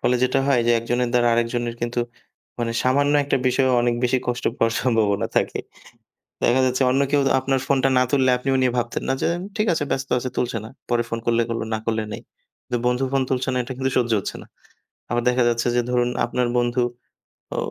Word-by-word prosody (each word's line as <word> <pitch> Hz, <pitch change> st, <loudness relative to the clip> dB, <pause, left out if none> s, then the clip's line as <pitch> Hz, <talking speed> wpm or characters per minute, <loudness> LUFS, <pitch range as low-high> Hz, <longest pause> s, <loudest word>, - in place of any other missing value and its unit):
ফলে 125 Hz, -, +2 dB
যেটা 130 Hz, +1 st, +2 dB
হয় 130 Hz, -4 st, +3 dB
যে, -, -, +4 dB
একজনের 120 Hz, +1 st, -1 dB
দ্বারা 120 Hz, -1 st, +3 dB
আরেকজনের 120 Hz, 0 st, -1 dB
কিন্তু 120 Hz, 0 st, -1 dB, 0.6 s
মানে 115 Hz, -1 st, -1 dB
সামান্য 140 Hz, +3 st, +2 dB
একটা 145 Hz, -, +1 dB
বিষয়েও 130 Hz, 0 st, +3 dB
অনেক 120 Hz, 0 st, +2 dB
বেশি 125 Hz, +1 st, +2 dB
কষ্ট 125 Hz, 0 st, -2 dB
পাওয়ার 115 Hz, 0 st, +2 dB
সম্ভাবনা 110 Hz, -5 st, +1 dB
থাকে -, -, +1 dB, 0.9 s
দেখা 130 Hz, +2 st, +4 dB
যাচ্ছে 130 Hz, +1 st, +1 dB
অন্য 135 Hz, +2 st, +2 dB
কেউ 145 Hz, -, +3 dB, 0.2 s
আপনার 135 Hz, 0 st, 0 dB
ফোনটা 135 Hz, -1 st, +2 dB
না -, -, +5 dB
তুললে, 130 Hz, -2 st, +3 dB
আপনিও 135 Hz, +1 st, 0 dB
নিয়ে 125 Hz, -1 st, +2 dB
ভাবতেন 120 Hz, 0 st, -2 dB
না। -, -, +2 dB
যে -, -, +2 dB, 0.3 s
ঠিক 215 Hz, -, +1 dB
আছে 150 Hz, -3 st, 0 dB
ব্যস্ত 135 Hz, 0 st, -2 dB
আছে 130 Hz, +1 st, -3 dB
তুলছে 120 Hz, -2 st, -1 dB
না। -, -, -8 dB, 0.2 s
পরে 120 Hz, -1 st, +2 dB
ফোন 115 Hz, -, -3 dB
করলে 115 Hz, 0 st, +3 dB
করলো 115 Hz, -1 st, -2 dB
না 110 Hz, -, -1 dB
করলে 110 Hz, -1 st, 0 dB
নেই। -, -, -6 dB, 0.4 s
কিন্তু 120 Hz, -, -2 dB
বন্ধু 125 Hz, +2 st, +1 dB
ফোন 135 Hz, -, +2 dB
তুলছে 130 Hz, -1 st, 0 dB
না 125 Hz, -, -2 dB
এটা 120 Hz, -, -6 dB
কিন্তু 130 Hz, 0 st, 0 dB
সহ্য 120 Hz, -2 st, +2 dB
হচ্ছে -, -, -5 dB
না। -, -, -14 dB, 0.6 s
আবার 120 Hz, +1 st, 0 dB
দেখা 125 Hz, 0 st, +2 dB
যাচ্ছে 120 Hz, 0 st, 0 dB
যে, 120 Hz, -, +3 dB
ধরুন 120 Hz, -1 st, +2 dB, 0.2 s
আপনার 125 Hz, -1 st, -1 dB
বন্ধু 120 Hz, +1 st, +1 dB, 0.7 s
অ -, -, -3 dB
125 Hz, 210 wpm, -22 LUFS, 120-130 Hz, 0.9 s, না